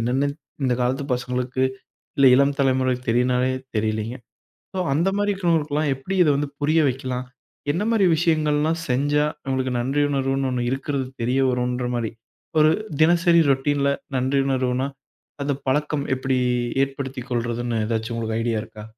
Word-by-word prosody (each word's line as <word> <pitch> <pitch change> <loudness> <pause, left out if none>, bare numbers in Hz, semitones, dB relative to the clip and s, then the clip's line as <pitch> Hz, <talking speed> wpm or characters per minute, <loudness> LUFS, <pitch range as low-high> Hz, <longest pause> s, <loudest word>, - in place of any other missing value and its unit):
என்னன்னே 130 +5 +1 0.4
இந்தக் 125 -1 +1
காலத்து 130 +3 0
பசங்களுக்கு, 125 +1 -2 0.6
இல்ல 140 - +5
இளம் 140 +1 +3
தலைமுறைக்குத் 130 -2 +1
தெரிஞ்சாலே 125 +1 +2 0.3
தெரியலைங்க. 110 +3 -1 0.6
சோ - - -2
அந்த 165 +7 +2
மாதிரி 205 0 +1
இருக்கிறவங்களுக்குலாம் 155 -5 0
எப்படித் 180 +8 0
இத 150 - +3
வந்து 145 0 -1
புரிய 155 +3 +3
வைக்கலாம்? 130 -1 -3 0.5
என்ன 175 +6 -1
மாதிரி 225 -4 +3
விஷயங்கள்லாம் 155 -1 +1
செஞ்சா 145 +4 +2 0.2
அவங்களுக்கு 130 -1 -1
நன்றி 135 +4 0
உணர்வுன்னு 135 -1 0
ஒண்ணு 125 -1 -1
இருக்கிறது 135 0 -2 0.2
தெரியவரும்ன்ற 125 0 +1
மாதிரி. 115 -2 -1 0.5
ஒரு 155 0 +6 0.3
தினசரி 170 +1 +5
ரொடீன்ல 140 +1 +2 0.3
நன்றி 130 +2 +1
உணர்வுனா 130 0 0 0.6
அந்தப் 140 -1 -2
பழக்கம் 150 +1 0
எப்படிஏற்படுத்திக் 130 +1 -1
கொள்றதுன்னு 120 -1 -1
ஏதாச்சு 115 +1 -2
உங்களுக்கு 110 -1 -2
ஐடியா 115 -1 0
இருக்கா? 110 -1 -11
130 Hz, 135 wpm, -23 LUFS, 125-145 Hz, 0.6 s, ஒரு